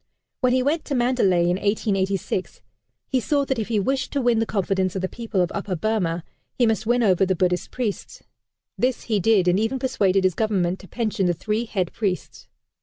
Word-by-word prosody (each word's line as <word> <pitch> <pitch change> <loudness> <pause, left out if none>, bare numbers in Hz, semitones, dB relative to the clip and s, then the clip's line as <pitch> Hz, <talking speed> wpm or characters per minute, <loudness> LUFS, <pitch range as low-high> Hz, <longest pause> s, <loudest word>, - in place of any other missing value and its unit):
When 255 -2 +2
he 255 0 +2
went 305 +4 0
to 280 - -2
Mandalay, 240 -8 +2
in 175 +1 +1
1886, 195 -2 -1 0.4
he 260 - +1
saw 280 +3 +1
that 265 -3 -1
if 215 - -2
he 220 -2 +1
wished 260 +6 -1
to 285 - +1
win 240 -2 +3
the 225 - 0
confidence 190 -2 0
of 190 - -3
the - - +1
people 220 -3 -2
of 175 - 0
Upper 200 -2 -3
Burmah, 175 -4 -1 0.3
he 245 - +4
must 220 -1 0
win 240 0 +3
over 190 -3 +3
the 190 0 +1
Buddhist 180 0 0
priests. 235 -6 -4 0.6
This 250 -1 0
he 215 -3 0
did, 200 -2 +3
and 180 +2 +3
even 225 +5 0
persuaded 195 -7 +1
his 185 -1 +3
Government 190 -2 0
to 190 - -13
pension 215 -5 -1
the 175 - +1
three 215 +6 -2
head 190 -6 -2
priests. 195 -5 -3
210 Hz, 205 wpm, -23 LUFS, 185-240 Hz, 0.6 s, he